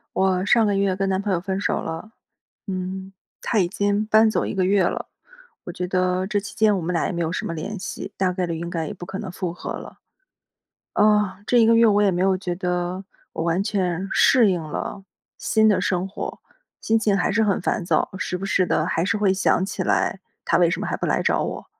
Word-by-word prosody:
我 190 0 +2
上 230 0 +4
个 205 -1 +1
月 195 -1 +1
跟 195 0 -1
男 190 0 0
朋 200 -1 -1
友 175 - 0
分 190 0 -3
手 - - 0
了， 165 +7 -6 0.6
嗯， 190 0 -5 0.3
他 220 - +1
已 175 - +2
经 205 +2 0
搬 220 +1 +5
走 215 - 0
1 - - -3
个 190 -1 +1
月 195 +1 +3
了， 175 - -1 0.6
我 - - -6
觉 180 +1 -4
得 185 0 0
这 205 0 0
期 200 - -8
间 215 -2 +3
我 - - -2
们 175 +1 -3
俩 170 - +1
也 - - -3
没 170 - -3
有 165 -1 -1
什 - - -3
么 165 - -4
联 200 +6 -5
系， 195 +1 -6
大 185 -1 +1
概 180 0 -1
率 170 - -3
应 170 +1 -4
该 165 -2 -2
也 - - -5
不 180 - -11
可 190 +2 -6
能 195 -3 -6
复 180 -1 -3
合 175 - -6
了。 - - -8 1.0
啊， 210 -2 +3
这 245 - +3
一 230 - +6
个 230 +1 +5
月 230 0 +6
我 205 -1 +4
也 205 - +4
没 180 -1 0
有 190 0 +3
觉 180 -2 -4
得 180 +1 -2 0.3
我 160 - -3
完 170 +3 +1
全 190 -3 -1
适 240 -6 +5
应 180 -3 0
了 155 +5 -5 0.3
新 220 -1 +2
的 205 - +3
生 185 0 0
活， 195 - -6 0.4
心 225 - +1
情 210 -3 +2
还 180 - +1
是 220 +3 +2
很 200 -3 +1
烦 180 - -1
躁， 170 -3 +1
时 185 -1 -3
不 195 - -5
时 190 -1 +2
地 155 -3 +1
还 165 -1 0
是 205 +4 0
会 200 -2 +2
想 190 -1 +2
起 195 -1 -3
来 190 +1 0 0.2
他 170 - +3
为 175 -1 +4
什 - - -2
么 - - -3
还 - - -1
不 - - -3
来 - - +1
找 - - +1
我， - - -5
190 Hz, 260 characters per minute, -23 LUFS, 180-205 Hz, 1.0 s, 一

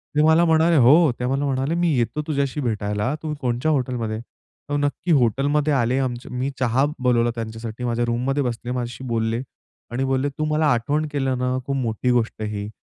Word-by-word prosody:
ते 150 - +4
मला 160 +2 +5
म्हणाले 165 +1 +4
हो. 150 +4 +6
ते 125 - -1
मला 135 +3 0
म्हणाले 135 +2 0
"मी 175 - +3
येतो 120 +5 0
तुझ्याशी 140 -2 -1
भेटायला. 105 0 -1
तू 155 -1 -2
कोणच्या 125 +5 0
हॉटेलमधे?" 125 -6 -1 0.5
हो. 145 - 0
नक्की 145 +5 -1
हॉटेलमध्ये 145 +5 +1
आले 125 -1 +1
आमच्या 125 -2 -3
मी 125 +2 -2
चहा 130 +2 +2
बोलवला 120 -2 +2
त्यांच्यासाठी. 115 +1 -6
माझ्या 120 0 0
रूममध्ये 125 +4 0
बसले, 120 0 -3
माझ्याशी 125 +1 -4
बोलले 115 0 -1 0.5
आणि 125 +3 -1
बोलले 135 +1 0
"तू 155 - 0
मला 155 +1 +1
आठवण 145 +6 0
केलं 135 -3 0
ना, 125 0 0
खूप 140 - -2
मोठी 125 -1 0
गोष्ट 120 -2 0
आहे 105 - -2
ही. 105 - -5
125 Hz, 185 wpm, -22 LUFS, 120-145 Hz, 0.5 s, हो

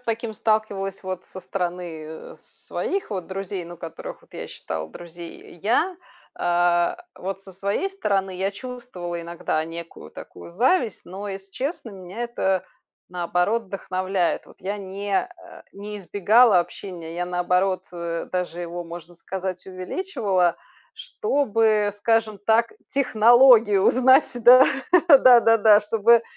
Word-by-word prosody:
таким 230 -1 -3
сталкивалась, 205 -3 -1
вот, 185 -1 -5
со - - -10
стороны, 175 -4 -4
э, 160 0 -10
с - - -25
своих 390 -8 -3
вот 185 -4 -4
друзей, 195 0 -5
ну 175 +1 -10
которых, 165 -1 -9
вот, - - -25
я - - -7
считала 80 -1 -6
друзей, 170 - -11
я, 250 - +1 0.4
а, 175 0 +2 0.2
вот, 195 +1 -6
со 195 - -13
своей 200 - -2
стороны 195 - -1
я 190 +2 -1
чувствовала 205 -7 -7
иногда 170 -2 -2
некую 170 0 -9
такую - - -11
зависть, 235 - +1
но, 195 +3 -7
если 195 0 -8
честно, 265 - -4
меня 190 +3 -8
это 190 -6 -1 0.5
наоборот 180 +5 0
вдохновляет. 185 -2 -2
Вот - - -19
я 200 +3 -3
не 200 +1 -5
а, 340 - -4
не 205 +1 -8
избегала 205 +3 +4
общения, 175 -1 -5
я 175 +1 -2
наоборот, 180 +1 0
э, 170 -1 -4
даже 180 -1 -3
его, 175 +1 -5
можно 170 0 -10
сказать, 185 +1 -6
увеличивала, 190 - -1 0.4
чтобы, 225 - +1
скажем 225 0 +1
так, 225 +3 +2 0.2
технологию 235 -4 +5
узнать. 260 +5 +5
Да, 250 +3 +9 0.5
да-да-да, 230 -6 +7
чтобы 225 +2 +4
195 Hz, 130 wpm, -23 LUFS, 175-225 Hz, 0.5 s, Да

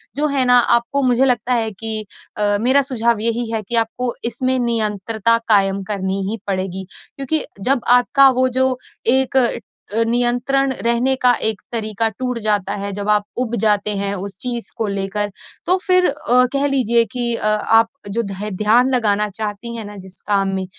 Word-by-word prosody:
जो 295 +2 +1
है 275 -3 0
ना 245 0 +5 0.2
आपको 260 +4 -3
मुझे 250 +1 +3
लगता 250 -1 +1
है 225 -2 0
कि 215 +1 -2 0.3
अ, 205 -1 +2
मेरा 260 +4 +4
सुझाव 235 -3 0
यही 230 +1 -1
है 225 -1 -2
कि 235 - 0
आपको 245 +2 -5 0.2
इसमें 255 +2 -1
नियंत्रता 225 -1 0
कायम 195 -1 +3
करनी 190 0 -3
ही 225 - -5
पड़ेगी। 190 -1 -3 0.3
क्योंकि 280 +3 0 0.2
जब 260 +3 +1 0.2
आपका 275 +2 +4
वो 260 - +3
जो 260 -1 +1 0.3
एक 265 +2 +3
अ, 245 -2 +5 0.6
नियंत्रण 245 +3 +1
रहने 240 +3 +2
का 250 - +7 0.2
एक 220 -3 -2
तरीका 220 -1 -1
टूट 250 +2 -4
जाता 205 -2 0
है 200 - -4
जब 205 +1 -5
आप 210 -1 +3
उब 240 -2 -2
जाते 210 -1 +2
हैं 200 0 -2
उस 195 -1 -7
चीज़ 240 -2 -3
को 220 - -2
लेकर 200 +1 -2 0.4
तो 365 - +4
फिर 365 -1 +3
अ, 250 -3 +2
कह 280 0 0
लीजिए 235 -4 +2
कि 240 -1 0
अ, 215 - 0
आप 225 +2 +3 0.2
जो 230 +4 -1
ध्य 200 +1 -5
ध्यान 240 +5 +4
लगाना 210 -3 +1
चाहती 215 +3 -5
हैं 225 -2 -6
ना, 205 - -10
जिस 190 0 -11
काम 200 -1 +1
में 190 0 -3
230 Hz, 180 wpm, -18 LUFS, 205-250 Hz, 0.6 s, का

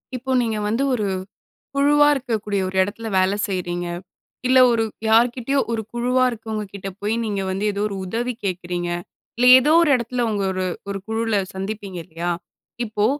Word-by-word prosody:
இப்போ, 260 +2 -4
நீங்க 225 -2 -1
வந்து 230 +6 0
ஒரு, 215 -5 0 0.7
குழுவா 290 +1 +5
இருக்கக்கூடிய 220 -6 -2
ஒரு 190 - -6
எடத்துல 220 +4 -4
வேல 185 +1 +3 0.2
செய்றீங்க. 175 -2 -2 0.6
இல்ல, 260 +1 +5
ஒரு 225 -1 +2 0.2
யார்க்கிட்டயோ 245 +4 +3
ஒரு 225 -1 -1
குழுவா 250 +2 +2
இருக்கவங்க 220 -2 -5
கிட்ட 195 -1 -5
போயி 210 +2 0
நீங்க 200 -3 -2
வந்து 195 +2 -2
ஏதோ 200 - -4
ஒரு 200 - -5
உதவி 235 +6 -2
கேக்குறீங்க. 175 -2 -2 0.5
இல்ல, 245 +2 +3
ஏதோ 275 +4 +2
ஒரு 325 - +3
எடத்துல 245 0 -2
உங்க 205 -2 -1
ஒரு 185 0 -2 0.2
ஒரு 200 0 -3
குழுவுல 225 0 0 0.2
சந்திப்பீங்க 195 -1 -5
இல்லயா? 170 +1 -4 0.5
இப்போ, 215 -2 0
220 Hz, 160 wpm, -22 LUFS, 195-240 Hz, 0.7 s, குழுவா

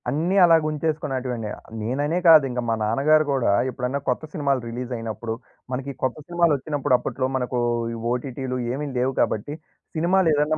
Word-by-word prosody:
అన్నీ 165 +7 0
అలాగుంచేసుకునేటివండి. 150 -7 0 0.3
నేననే 145 +9 0
కాదు, 160 -3 +9
ఇంకా 125 0 -2
మా 115 - +2
నాన్నగారు 145 +8 +3
కూడా 130 -6 +2 0.2
ఎప్పుడన్నా 130 +2 -2
కొత్త 125 - 0
సినిమాలు 140 -4 0
రిలీజయినప్పుడు, 115 -2 -4 0.4
మనకి 130 +2 -3
ఈ - - -25
కొత్త 130 +1 0
సినిమాలచ్చినప్పుడు 150 -6 +1
అప్పట్లో 130 +1 -2
మనకు 125 -1 -1 0.3
ఈ - - -4 0.2
ఓటీటీలు 130 +1 -3 0.2
ఏమి 145 +3 -3
లేవు 130 +2 +1
కాబట్టి, 125 +8 -1 0.4
సినిమాలేదన్నా 155 -3 +2
135 Hz, 135 wpm, -23 LUFS, 125-155 Hz, 0.4 s, కాదు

